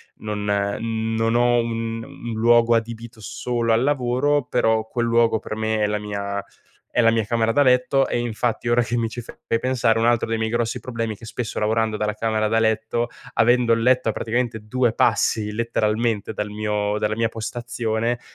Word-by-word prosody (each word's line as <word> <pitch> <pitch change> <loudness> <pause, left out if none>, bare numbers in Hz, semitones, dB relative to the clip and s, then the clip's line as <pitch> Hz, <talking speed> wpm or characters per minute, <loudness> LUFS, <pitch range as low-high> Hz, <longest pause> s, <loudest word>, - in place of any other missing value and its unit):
non, 105 -1 -4
ehm, 100 +1 0
mhmm 115 0 -2
non 115 +1 +1
ho 120 0 +4
un 115 -1 -3
un 120 0 -8
luogo 115 +1 +4
adibito 115 0 -4
solo 115 +3 -2
al 115 +2 +3
lavoro, 140 +1 +1
però 110 -3 +1
quel 120 +1 -2
luogo 115 -1 +3
per 110 - -6
me 110 0 -1
è 105 - +2
la 105 - -1
mia 100 -1 -4 0.5
é 120 - +2
la 115 -1 +5
mia 115 -1 +1
camera 115 +1 +1
da 145 - +3
letto. 130 +1 +3
E - - -1
infatti 120 0 -2
ora 120 +1 +3
che 120 +1 -1
mi 115 -1 0
ci 120 - -6
fai 115 - -12
pe 115 - 0
pensare 115 -3 +1
un 115 - +2
altro 120 -1 +2
dei 115 0 -1
miei 110 0 0
grossi 120 0 -1
problemi 115 -3 -3
è - - -13
che 115 - -12
spesso 115 0 -4
lavorando 110 0 +1
dalla 105 0 -1
camera 110 0 0
da 110 +1 +1
letto, 110 +2 0 0.2
avendo 120 +1 +3
il 115 0 0
letto 125 -1 +3
a - - +2
praticamente 115 -1 -2
due 120 0 +1
passi 110 -2 +1
letteralmente 110 -1 -1
dal 105 0 -3
mio 105 0 -1
dalla 105 0 -1
mia 115 0 0
postazione, 115 +1 -2
115 Hz, 205 wpm, -22 LUFS, 110-120 Hz, 0.5 s, la